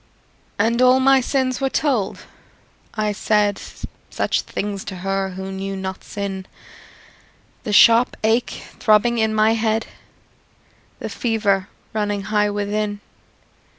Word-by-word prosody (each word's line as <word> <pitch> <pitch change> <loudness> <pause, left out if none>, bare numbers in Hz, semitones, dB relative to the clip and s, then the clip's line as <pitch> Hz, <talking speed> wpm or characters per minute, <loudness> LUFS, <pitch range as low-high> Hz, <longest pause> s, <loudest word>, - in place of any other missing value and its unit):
And 235 +2 +2
all 255 +1 +6
my 270 0 +5
sins 255 0 -1
were 270 - +1
told; 260 -9 0 0.7
I 215 -1 0
said 205 -1 +1 0.5
Such - - 0
things 200 -1 -4
to 190 - -6
her 195 +1 -2
who 190 +1 -6
knew 195 0 -4
not 190 -1 -5
sin 195 -2 -5 1.2
The 210 - -2
sharp 230 +3 +6
ache 225 +3 0 0.2
throbbing 235 +1 +3
in 220 0 +2
my 215 +1 +4
head, 225 0 0 1.1
The - - -6
fever 205 -5 0 0.3
running 205 -2 -1
high 210 0 +1
within. 205 0 -2
210 Hz, 120 wpm, -21 LUFS, 200-230 Hz, 1.2 s, all